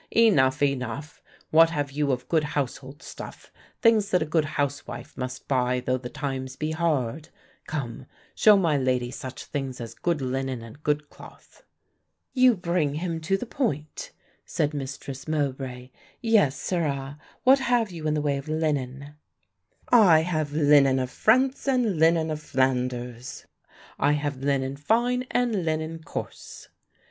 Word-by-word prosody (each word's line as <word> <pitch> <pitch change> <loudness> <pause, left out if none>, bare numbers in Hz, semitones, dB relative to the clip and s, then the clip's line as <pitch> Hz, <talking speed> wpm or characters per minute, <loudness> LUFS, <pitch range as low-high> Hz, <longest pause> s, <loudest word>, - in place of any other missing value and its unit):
"Enough, 145 -13 +4
enough, 140 +1 -2 0.3
what 165 +1 +7
have 145 -3 -2
you 145 0 0
of 125 -1 -3
good 160 -2 +2
household 145 -1 -4
stuff, - - -10 0.3
things 220 -3 +4
that 180 -3 +2
a - - -4
good 155 0 +1
housewife 145 0 -3
must 125 0 -6
buy 125 -2 +1
though 130 +1 -1
the 125 -1 -7
times 130 -2 -4
be 155 +3 -3
hard. 155 -3 -1 0.4
Come, 135 -3 -5 0.3
show 210 -2 +6
my 165 -6 +2
lady 125 -2 0
such 130 0 -7
things 135 -3 -4
as 115 -1 -7
good 170 +5 -1
linen 130 -2 -3
and 115 +6 -12
good 150 0 -1
cloth." - - -15 0.7
"You 255 -2 +5
bring 170 -5 0
him 165 0 -3
to 190 +5 +1
the 245 - -5
point," 155 - -3 0.3
said 150 0 -1
Mistress 135 -1 -6
Mowbray; 130 -4 -3 0.3
"yes, 210 - +3
sirrah, 145 -5 -2 0.2
what 265 +2 +6
have 240 -5 +1
you 160 -3 -5
in 155 - +1
the 150 - 0
way 140 -2 +1
of 140 +2 -7
linen?" 145 -3 -2 0.8
"I 190 -10 +7
have 155 -3 -1
linen 145 -3 +5
of 130 -1 -2
France 260 +5 +2
and 240 - +1
linen 160 0 +3
of 155 0 -4
Flanders; 125 -2 -2 0.5
I 145 - +3
have 145 -2 -2
linen 135 0 -1
fine 240 - +1
and 235 -6 0
linen 160 0 -2
coarse." - - -8
145 Hz, 150 wpm, -26 LUFS, 130-165 Hz, 0.8 s, what